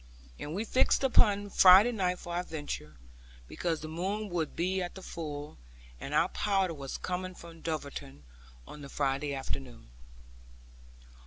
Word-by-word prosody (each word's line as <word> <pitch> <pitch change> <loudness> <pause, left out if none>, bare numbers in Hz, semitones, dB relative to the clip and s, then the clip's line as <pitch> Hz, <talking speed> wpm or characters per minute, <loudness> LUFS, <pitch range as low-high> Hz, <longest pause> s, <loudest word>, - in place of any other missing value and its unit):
And 150 +3 -5
we 210 +4 -2
fixed 260 +3 +3
upon 205 -6 +4
Friday 190 +7 +8
night 185 -5 0
for 175 - -7
our 175 - 0
venture, 145 - -6 0.5
because 165 - -2
the 155 - -5
moon 195 +6 -3
would 170 -4 -2
be 185 +3 0
at 175 - -4
the 190 - -9
full; 150 - -6 0.4
and 140 - -6
our 165 +4 +4
powder 195 -4 +1
was 140 -3 -6
coming 185 0 -4
from 165 -1 -12
Dulverton 140 - -5 0.4
on 150 - -10
the 140 - -9
Friday 140 +1 -1
afternoon. 125 - -6
170 Hz, 150 wpm, -31 LUFS, 145-190 Hz, 0.5 s, Friday